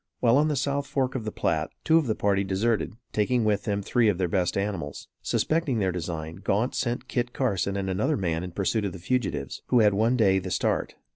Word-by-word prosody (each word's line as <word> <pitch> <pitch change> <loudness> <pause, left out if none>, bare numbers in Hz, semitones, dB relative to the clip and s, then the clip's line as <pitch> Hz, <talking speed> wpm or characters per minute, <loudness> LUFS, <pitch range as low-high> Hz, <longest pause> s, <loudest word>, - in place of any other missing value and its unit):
While 120 +1 +4
on 150 +2 +4
the 150 - 0
south 140 +1 -1
fork 130 -2 0
of 120 -4 -4
the 110 - -2
Platte, 80 -5 -1
two 160 0 +5
of 150 - -2
the 110 - +1
party 100 -1 +1
deserted, 105 +3 0 0.2
taking 115 +2 +1
with 105 -2 +1
them 100 -1 -1
three 115 +1 +3
of 100 - 0
their 90 -1 +1
best 90 +1 0
animals. 95 -8 -3
Suspecting 155 -6 0
their 95 -3 +1
design, 80 -1 -5
Gaunt 110 +6 +1
sent 120 0 -2
Kit 120 -1 -2
Carson 100 -6 0
and 95 -1 -2
another 110 +11 0
man 85 -4 -1
in 90 - -5
pursuit 100 +4 -1
of 100 -3 -2
the - - -7
fugitives, 90 - -2
who 125 -2 +4
had 105 -2 +5
one 115 +5 +2
day 95 -4 +4
the 95 0 -6
start. - - 0
105 Hz, 225 wpm, -26 LUFS, 95-125 Hz, 0.2 s, two